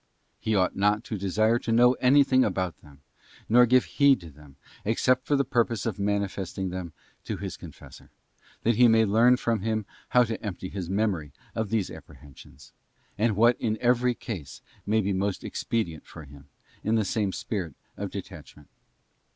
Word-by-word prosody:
He 110 Hz, -, -1 dB
ought 95 Hz, -2 st, +1 dB
not 105 Hz, +2 st, +1 dB
to 110 Hz, -, -5 dB
desire 110 Hz, +5 st, +2 dB
to 115 Hz, -, -4 dB
know 120 Hz, +2 st, +5 dB
anything 130 Hz, 0 st, +5 dB
about 95 Hz, -3 st, -2 dB
them, 70 Hz, -1 st, -18 dB, 0.5 s
nor 120 Hz, +2 st, +6 dB
give 125 Hz, +1 st, +4 dB
heed 140 Hz, -2 st, +3 dB
to 85 Hz, -2 st, -11 dB
them, 75 Hz, -1 st, -17 dB, 0.3 s
except 125 Hz, +4 st, +1 dB
for 145 Hz, -, +2 dB
the 140 Hz, 0 st, +1 dB
purpose 115 Hz, -1 st, 0 dB
of 110 Hz, -4 st, -3 dB
manifesting 100 Hz, -2 st, -2 dB
them 90 Hz, -2 st, -5 dB, 0.3 s
to -, -, -4 dB
his -, -, -5 dB
confessor, -, -, -13 dB, 0.5 s
that 115 Hz, -1 st, +2 dB
he 125 Hz, -, +7 dB
may 110 Hz, -1 st, +4 dB
learn 115 Hz, +5 st, +4 dB
from 115 Hz, -3 st, -1 dB
him 110 Hz, 0 st, -1 dB, 0.2 s
how 125 Hz, -, +5 dB
to 115 Hz, -1 st, -5 dB
empty 95 Hz, -3 st, -5 dB
his 90 Hz, -3 st, -6 dB
memory 95 Hz, -8 st, -1 dB, 0.2 s
of 110 Hz, -2 st, -2 dB
these 110 Hz, -3 st, -1 dB
apprehensions, 70 Hz, -2 st, -14 dB, 0.5 s
or 115 Hz, +2 st, +3 dB
what 120 Hz, +4 st, +3 dB
in 110 Hz, -2 st, 0 dB
every 125 Hz, 0 st, +2 dB
case 85 Hz, -, -8 dB, 0.2 s
may 110 Hz, +1 st, +2 dB
be 100 Hz, 0 st, -1 dB
most 95 Hz, +1 st, -2 dB
expedient 85 Hz, -10 st, -3 dB
for 80 Hz, -, -11 dB
him, 70 Hz, 0 st, -15 dB, 0.4 s
in 110 Hz, +2 st, +1 dB
the 110 Hz, -2 st, +1 dB
same 100 Hz, 0 st, -1 dB
spirit 90 Hz, -8 st, -4 dB, 0.2 s
of -, -, -5 dB
detachment. 75 Hz, -1 st, -10 dB
105 Hz, 175 wpm, -26 LUFS, 95-120 Hz, 0.5 s, he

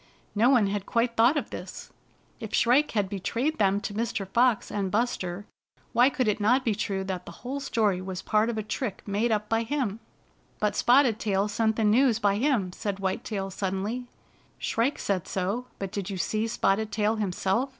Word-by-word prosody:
No 225 Hz, +4 st, +4 dB
one 245 Hz, -6 st, +5 dB
had 200 Hz, 0 st, -2 dB
quite 235 Hz, 0 st, +1 dB
thought 235 Hz, +7 st, +4 dB
of -, -, -3 dB
this. -, -, -8 dB, 0.5 s
If 220 Hz, -3 st, -4 dB
Shrike 265 Hz, +6 st, +4 dB
had 205 Hz, -3 st, +1 dB
be 195 Hz, 0 st, -5 dB
trayed 255 Hz, -, -1 dB
them 200 Hz, -1 st, +3 dB
to 205 Hz, -, -4 dB
Mr. 225 Hz, -2 st, -2 dB
Fox 235 Hz, +2 st, +2 dB
and 200 Hz, -2 st, -1 dB
Buster, 205 Hz, -4 st, -1 dB, 0.5 s
why 245 Hz, +3 st, +5 dB
could 260 Hz, -4 st, -1 dB
it 210 Hz, +1 st, +1 dB
not 250 Hz, +6 st, +3 dB
be 225 Hz, -, +2 dB
true 195 Hz, -2 st, -2 dB
that 190 Hz, -2 st, -5 dB
the -, -, -7 dB
whole 270 Hz, +3 st, -3 dB
story 215 Hz, -8 st, 0 dB
was 185 Hz, -1 st, -5 dB
part 215 Hz, +1 st, +2 dB
of 230 Hz, -, -3 dB
a 215 Hz, -, -2 dB
trick 215 Hz, -1 st, -4 dB
made 210 Hz, +4 st, 0 dB
up 210 Hz, -1 st, 0 dB
by 225 Hz, +1 st, +1 dB
him? 230 Hz, -4 st, -2 dB, 0.6 s
"But 210 Hz, -1 st, 0 dB
Spotted 245 Hz, -3 st, +4 dB
Tail 200 Hz, -2 st, +1 dB
sent 220 Hz, +1 st, +1 dB
the 225 Hz, -, 0 dB
news 230 Hz, +2 st, +4 dB
by 205 Hz, -3 st, +2 dB
him," 225 Hz, -8 st, +1 dB
said 200 Hz, 0 st, -3 dB
White 190 Hz, -1 st, -2 dB
Tail 195 Hz, -3 st, -4 dB
suddenly. 200 Hz, +6 st, -3 dB, 0.3 s
" -, -, -33 dB
Shrike 240 Hz, +5 st, 0 dB
said 190 Hz, -4 st, -2 dB
so, 200 Hz, +7 st, -2 dB
but 195 Hz, -1 st, -5 dB
did 200 Hz, -2 st, -4 dB
you 195 Hz, -, -4 dB
see 215 Hz, +5 st, -1 dB
Spotted 220 Hz, -1 st, 0 dB
Tail 215 Hz, +1 st, +1 dB
himself?" 200 Hz, +5 st, 0 dB
215 Hz, 200 wpm, -27 LUFS, 195-235 Hz, 0.6 s, one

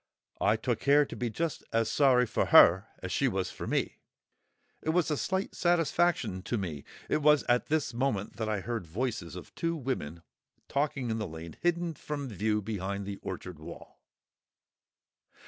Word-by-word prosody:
I 105 Hz, -, +3 dB
took 115 Hz, +1 st, -1 dB
care 145 Hz, +1 st, +5 dB
to -, -, -8 dB
be 120 Hz, -, -2 dB
just 160 Hz, +8 st, -3 dB
as 115 Hz, -1 st, +2 dB
sorry 125 Hz, 0 st, +4 dB
for -, -, 0 dB
her 95 Hz, +5 st, +7 dB, 0.2 s
as 95 Hz, -, -4 dB
she 140 Hz, -, +2 dB
was 95 Hz, -6 st, -1 dB
for -, -, -7 dB
me: -, -, -1 dB, 0.8 s
it -, -, -3 dB
was 165 Hz, -1 st, +2 dB
a -, -, +2 dB
slight 190 Hz, +6 st, -2 dB
satisfaction 175 Hz, -, +1 dB
to 115 Hz, +6 st, -2 dB
me! 85 Hz, -8 st, -4 dB, 0.2 s
It 155 Hz, -, +1 dB
was 150 Hz, 0 st, +5 dB
at 120 Hz, 0 st, +1 dB
this 155 Hz, -5 st, 0 dB
moment 115 Hz, -6 st, -1 dB
that 110 Hz, -1 st, -2 dB
I 105 Hz, -2 st, -1 dB
heard 115 Hz, -5 st, -4 dB
voices 105 Hz, -2 st, -3 dB
of 90 Hz, -, -10 dB
two 165 Hz, 0 st, -1 dB
women 85 Hz, -, -4 dB, 0.4 s
talking 140 Hz, -4 st, -1 dB
in 110 Hz, -, -1 dB
the 105 Hz, -, -2 dB
lane, 80 Hz, 0 st, -8 dB
hidden 175 Hz, -1 st, +1 dB
from 145 Hz, -3 st, -5 dB
view 105 Hz, +1 st, 0 dB
by 100 Hz, -2 st, -3 dB
the 100 Hz, 0 st, -5 dB
orchard 90 Hz, -3 st, -7 dB
wall. 75 Hz, -, -11 dB
115 Hz, 175 wpm, -30 LUFS, 95-145 Hz, 0.8 s, her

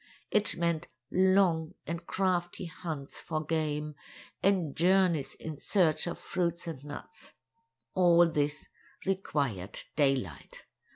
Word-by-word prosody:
It 210 Hz, -2 st, +3 dB
meant 170 Hz, -1 st, 0 dB, 0.2 s
long 185 Hz, -4 st, +3 dB
and 170 Hz, +1 st, -5 dB
crafty 185 Hz, -1 st, 0 dB
hunts 160 Hz, -5 st, -6 dB
for 155 Hz, -1 st, -3 dB
game, 150 Hz, -1 st, -1 dB, 0.5 s
and 185 Hz, -7 st, +2 dB
journeys 180 Hz, -4 st, +3 dB
in 155 Hz, -2 st, -6 dB
search 160 Hz, -2 st, +2 dB
of 170 Hz, -, -3 dB
fruits 170 Hz, -1 st, -2 dB
and 155 Hz, -5 st, -6 dB
nuts. 145 Hz, -, -10 dB, 0.6 s
All 175 Hz, -2 st, +6 dB
this 150 Hz, -2 st, -1 dB, 0.4 s
required 140 Hz, -, -1 dB, 0.2 s
daylight. 135 Hz, -, 0 dB
165 Hz, 110 wpm, -31 LUFS, 150-180 Hz, 0.6 s, All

